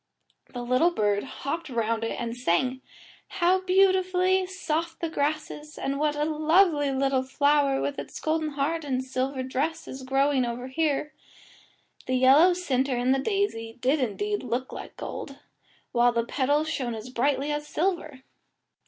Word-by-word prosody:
The 245 -1 -5
little 255 +8 +3
bird 205 -10 0
hopped 300 +4 -5
round 230 -2 -1
it 225 - -3
and 235 -1 -3
sang, 250 +4 0 0.6
"How 365 +1 +4
beautifully 375 0 +3
soft 330 -3 -3
the 335 -1 -3
grass 300 +1 -1
is, 300 0 -10
and 275 +1 -2
what 300 0 +1
a 295 0 0
lovely 310 -1 +3
little 270 -1 +1
flower 280 +1 +2
with 285 - -2
its - - -7
golden 310 -1 -1
heart 305 +4 -1
and 260 -3 -1
silver 260 +1 -2
dress 275 +5 -2
is 265 - -7
growing 270 +1 +2 0.3
here." 300 +1 -1 0.9
The 255 - +1
yellow 275 +8 +6
centre 270 -7 0
in 245 +2 +1
the 270 - +3
daisy 265 - -2
did 270 +5 +2
indeed 410 - -1
look 250 +2 -3
like - - -9
gold, 275 -1 -6 0.5
while 240 0 +4
the 235 0 +1
little 230 - -10
petals 290 +3 +2
shone 250 -7 -2
as 220 +3 -8
brightly 275 +3 0
as 295 0 -3
silver. 310 -7 -2
280 Hz, 160 wpm, -26 LUFS, 255-320 Hz, 0.9 s, yellow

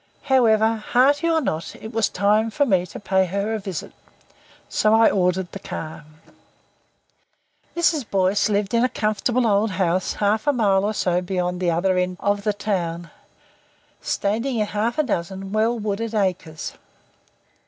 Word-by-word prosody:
However, 225 -5 +3
hearty 275 +8 +2
or 325 -1 +2
not, 160 - -3
it 220 - -9
was 225 -1 +1
time 210 +3 +2
for 285 +6 +1
me 185 -7 +1
to - - -9
pay 190 -1 +1
her 200 +4 -2
a 220 - -2
visit. 190 -5 -6 0.7
So 215 +1 +2
I 225 0 +5
ordered 180 -1 0
the 195 - -7
car. 155 -4 -7 1.7
Mrs. 310 -7 +1
Boyce 195 +2 +2
lived 205 0 0
in 235 +1 +3
a 255 - +2
comfortable 230 +3 0
old 210 0 +2
house 185 -1 0
half 215 +5 0
a 290 - +4
mile 200 -5 +2
or 215 +1 -1
so 180 -2 +1
beyond 180 -1 -2
the 180 -1 +1
other 180 +2 +1
end 180 0 -2
of 205 0 0
the 210 0 +1
town, 175 -5 -3 0.9
standing 230 +5 -1
in 215 - +1
half 210 +3 -2
a 305 - +3
dozen 190 - -3
well 220 +3 +1
wooded 215 +1 -3
acres. 180 -6 -2
205 Hz, 160 wpm, -22 LUFS, 185-225 Hz, 1.7 s, I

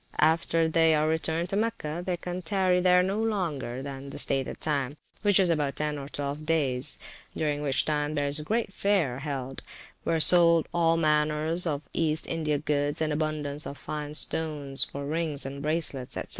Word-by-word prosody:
After 165 +1 +3
they 160 0 +4
are 155 0 +2
returned 160 +2 -1
to 195 - -2
Mecca, 190 -7 -2
they 180 -1 -2
can 180 +1 -5
tarry 185 +1 +1
there 180 0 +5
no 195 +4 -1
longer 155 - -2
than 140 0 -7
the - - -8
stated 135 -1 +1
time, 145 -2 -1 0.2
which 205 -2 +4
is 180 -3 +4
about 145 -4 0
ten 150 -1 -2
or 140 0 -8
twelve 145 +1 -4
days; 150 -4 0 0.4
during 150 -2 -1
which 140 -2 +1
time 150 0 -1
there 145 -1 0
is 140 +2 +3
a - - -5
great 220 +3 -1
fair 180 -13 +1
held, 135 -2 -5 0.4
where 165 - 0
are - - +1
sold 170 +1 +6
all 165 -1 +3
manner 150 -1 +1 0.2
of 145 -2 -3
East 160 -1 +1
India 155 -3 -1
goods, 145 0 -1
and 155 -1 0
abundance 150 -1 -2
of 140 - -7
fine 150 0 -6
stones 150 -4 +1
for 140 0 -6
rings 155 -2 -2
and 140 +1 -6
bracelets, 150 -4 -3
&c. - - -2
155 Hz, 185 wpm, -27 LUFS, 145-165 Hz, 0.4 s, sold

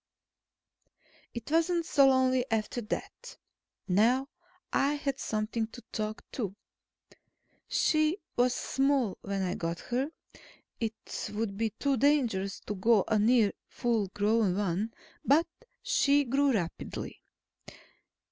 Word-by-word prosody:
It 235 +4 -6
wasn't 335 +1 +2
so 275 -3 +5
lonely 260 -1 +3
after 225 +2 -1
that. 210 - -6 0.5
Now 235 +8 +3 0.4
I 280 +2 +2
had 280 -2 -3
something 220 +1 -2
to 245 +2 -12
talk 215 0 -4
to. 200 -6 -3 1.1
She 310 +3 +2 0.2
was 245 0 +3
small 270 -6 +1
when 195 -1 -2
I 180 -1 -1
got 170 -1 -3
her 265 +4 +1 0.7
it 225 -1 -4
would 210 -2 -2
be 225 +2 0
too 280 -2 +1
dangerous 235 -9 +1
to - - -4
go 205 +1 +3
near 225 0 +4
a - - -10
full 230 -4 0
grown 205 -1 +1
one 205 +2 -1 0.3
but 305 +5 +4 0.4
she 285 +1 +3
grew 275 +2 +2
rapidly. 175 -8 -4
230 Hz, 120 wpm, -30 LUFS, 210-275 Hz, 1.1 s, so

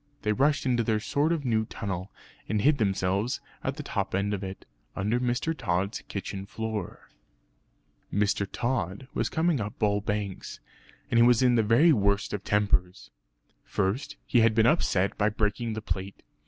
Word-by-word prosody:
They 105 - +1
rushed 145 +5 +2
into 120 -2 +2
their 110 -1 +1
short 150 +6 0
new 110 -2 +1
tunnel, 95 -3 -5 0.4
and 105 +1 +1
hid 145 0 +4
themselves 100 +2 0 0.2
at - - -2
the - - -6
top - - -2
end 100 +2 0
of 100 -1 -3
it, 95 0 -7 0.3
under 105 +5 0
Mr. 125 +6 0
Tod's 100 - -1
kitchen 100 0 -5
floor. 110 -3 -5 1.0
Mr. 100 0 +1
Tod 120 -2 -2
was - - 0
coming 160 -5 +1
up 105 0 -5
Bull 105 -1 +1
Banks, 105 -2 -4 0.5
and 115 - +4
he - - +7
was 120 +1 +5
in 125 -1 +5
the 115 - +4
very 120 +10 +5
worst 100 -3 +1
of 100 -1 -3
tempers. 100 -2 0 0.5
First 100 +9 -2
he 120 - +3
had 115 -1 +4
been 110 0 +4
upset 100 - +2
by 105 +1 +3
breaking 110 +2 -1
the 110 - -4
plate. 95 -2 -4
105 Hz, 165 wpm, -27 LUFS, 100-120 Hz, 1.0 s, he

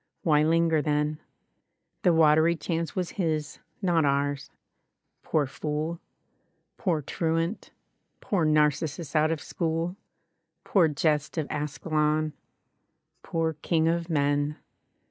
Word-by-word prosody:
Why 150 -3 +4
linger, 165 0 +3
then? 150 +1 0 0.8
The 180 - +4
watery 160 +1 +5
chance 165 +1 -3
was 180 -3 -2
his, 155 -3 -2 0.2
not 170 -3 +3
ours. 140 0 0 0.7
Poor 155 -2 +1
fooll 150 +4 -3 0.8
Poor 170 -8 -1
truant, 165 +6 -2 0.5
poor 190 -5 0
Narcissus 155 +1 +1
out 155 0 +4
of 165 -1 -1
school; 165 +2 -2 0.7
Poor 180 -5 +4
jest 150 +1 0
of 155 -3 -1
Askelon; 150 +1 0 0.9
poor 165 -1 -1
king 160 -2 +2
of 170 +1 0
men. 145 -1 +1
155 Hz, 105 wpm, -27 LUFS, 150-165 Hz, 0.9 s, watery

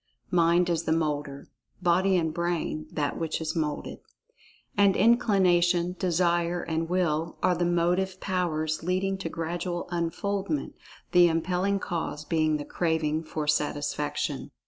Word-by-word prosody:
Mind 175 0 +4
is 170 -1 -1
the - - 0
moulder—body 165 +5 -1
(and 160 -2 0
brain) 170 -2 -2
that 145 -2 -2
which 165 -1 -2
is 160 -1 -3
moulded. 150 -3 -3 0.8
And 200 -1 +4
Inclination, 180 -6 +3
Desire, 175 -1 +1
and 165 0 -2
Will, 170 -3 0
are 185 - +4
the 175 0 0
motive 180 +2 +1
powers 160 -5 -1
leading 190 +2 -1
to 170 - -4
gradual 175 +2 -3
Unfoldment, 195 - -2 0.4
the 175 -1 +7
impelling 180 +4 0
cause 165 -5 -4
being 155 -1 +1
the 145 - -6
craving 160 -2 -1
for 155 -1 -4
Satisfaction. 145 -1 -1
170 Hz, 125 wpm, -27 LUFS, 155-180 Hz, 0.8 s, the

